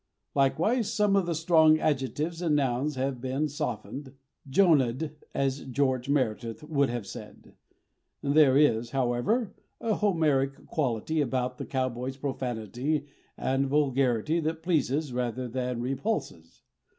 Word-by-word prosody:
Likewise 170 - +2
some 210 -3 +2
of 195 -3 +2
the 170 - 0
strong 160 -1 +5
adjectives 150 +3 -1
and 160 -4 +2
nouns 135 +1 0
have 130 -1 -2
been 135 +4 -1
softened, 130 0 -5 0.4
Jonahed, 145 -4 +3 0.2
as 135 0 0
George 130 -1 0
Meredith 120 -3 -1
would 140 -3 +1
have 120 -3 -3
said. - - -11 0.7
There 140 -1 +5
is, 120 -6 +3
however, 135 - 0 0.3
a 225 - 0
Homeric 150 -10 +1
quality 145 +2 -1
about 125 -2 -1
the - - -5
cowboy's 130 0 -2
profanity 130 +2 -3 0.3
and 135 +1 0
vulgarity 135 0 +1
that 160 0 -3
pleases 150 -4 0
rather 125 0 -2
than 125 0 -3
repulses. 130 - -3
135 Hz, 125 wpm, -28 LUFS, 125-155 Hz, 0.7 s, strong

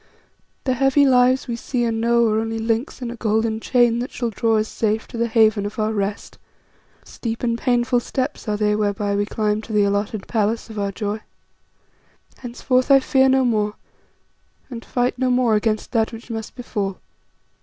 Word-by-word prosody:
The 260 - +1
heavy 270 +2 +3
lives 255 0 +3
we 235 - -2
see 240 +1 -2
and 225 -1 -1
know 235 0 +3
are 215 0 +1
only 225 0 -3
links 225 +4 -2
in 235 - -4
a - - -7
golden 220 0 0
chain 240 0 +2
that 245 - -3
shall 240 -3 -3
draw 225 +2 +1
us 215 0 0
safe 220 0 -1
to - - -10
the 235 - +1
haven 220 -2 +3
of 205 +1 -5
our 215 0 0
rest; 200 -1 -4 0.7
steep 230 0 -5
and 235 -1 +1
painful 245 +1 +1
steps 260 +2 -4
are 210 -1 0
they 210 0 +1
whereby 205 -1 -1
we 205 0 0
climb 210 -1 -1
to 225 - -10
the 210 -1 +4
alloted 200 +1 -1
palace 225 +1 -1
of 215 - -6
our 200 -1 -1
joy. 210 +1 -3 1.2
Henceforth 255 +1 -1
I 275 -1 +7
fear 265 0 +3
no 265 0 +3
more, 210 -3 0 1.0
and 230 -2 -7
fight 245 0 -1
no 260 -1 +1
more 250 -2 +2
against 215 0 0
that 225 -2 +1
which 230 +1 -10
must 225 -1 -6
befall. 205 -6 -4
225 Hz, 185 wpm, -21 LUFS, 215-245 Hz, 1.2 s, I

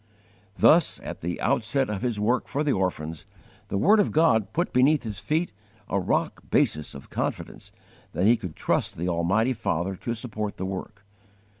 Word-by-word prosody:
Thus, 165 -1 +5
at - - -7
the 85 +1 -3
outset 135 +1 +1
of 105 -2 -4
his 120 -4 -1
work 115 +5 +1
for 145 +1 -1
the 150 - +1
orphans, 80 -5 -2 0.4
the 100 - -2
word 205 - +5
of 205 - +2
God 115 -10 +3
put 175 +2 -1
beneath 135 +4 +4
his 110 -3 -5
feet 160 +3 -1 0.4
a - - 0
rock - - -1
basis 75 -2 +1
of 70 - -11
confidence - - -4 0.4
that 90 - 0
he 115 +3 +6
could 90 -8 -7
trust - - -1
the 85 +3 -2
almighty 95 +9 +1
Father 95 -5 -2
to 115 +5 -3
support 110 -3 -5
the 95 - -3
work. 95 +2 -6
110 Hz, 175 wpm, -26 LUFS, 95-130 Hz, 0.4 s, he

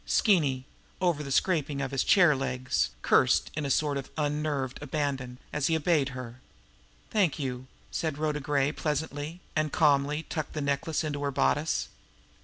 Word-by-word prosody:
Skeeny, 145 - +3 0.3
over 175 -5 +1
the 140 -2 -6
scraping 150 -3 +1
of 135 -1 -2
his 135 -1 +1
chair 175 -6 +5
legs, 130 -1 -1
cursed - - +3
in 150 -1 -2
a - - -3
sort 145 +1 +1
of 135 - -6
unnerved 145 -3 -1
abandon, 135 -4 -2 0.2
as 145 -2 +1
he 165 - +2
obeyed 155 -3 +2
her. 125 -1 -8 0.7
"Thank 190 -9 +2
you!" 130 -3 -4 0.2
said 155 -3 -2
Rhoda 150 -1 -1
Gray 145 0 +1
pleasantly 150 +2 -3
and 155 -2 +1
calmly 150 0 +3
tucked 155 -2 -4
the 155 - -3
necklace 140 +3 -1
into 145 -2 -3
her 140 - 0
bodice. 65 - +1
145 Hz, 160 wpm, -28 LUFS, 135-155 Hz, 0.7 s, chair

